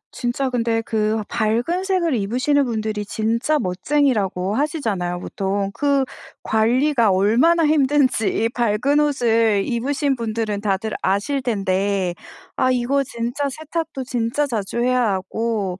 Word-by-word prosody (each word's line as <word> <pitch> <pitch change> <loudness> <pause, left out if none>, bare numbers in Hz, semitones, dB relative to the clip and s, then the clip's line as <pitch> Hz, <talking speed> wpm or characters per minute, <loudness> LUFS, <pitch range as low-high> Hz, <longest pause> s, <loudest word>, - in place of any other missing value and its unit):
진짜 255 +2 -2
근데 230 -2 0
그 220 0 0
밝은 240 - 0
색을 360 -6 +1
입으시는 255 +7 +1
분들이 215 -3 -2
진짜 230 +8 0
멋쟁이라고 200 -3 0
하시잖아요 220 - -1
보통. 195 +1 -2
그 280 -2 +2 0.4
관리가 235 +2 +2
얼마나 240 - +3
힘든지 270 -7 +2
밝은 240 +5 +2
옷을 230 -7 +2
입으신 270 +3 0
분들은 220 -3 -2
다들 205 +1 -1
아실 210 +9 0
텐데. 195 -5 0 0.4
아 255 - +2
이거 255 +3 +1
진짜 240 +3 -3
세탁도 315 0 -4
진짜 245 +3 -1
자주 225 -3 -3
해야 250 -3 +2
하고 195 -1 -2
235 Hz, 275 characters per minute, -21 LUFS, 210-275 Hz, 0.4 s, 얼마나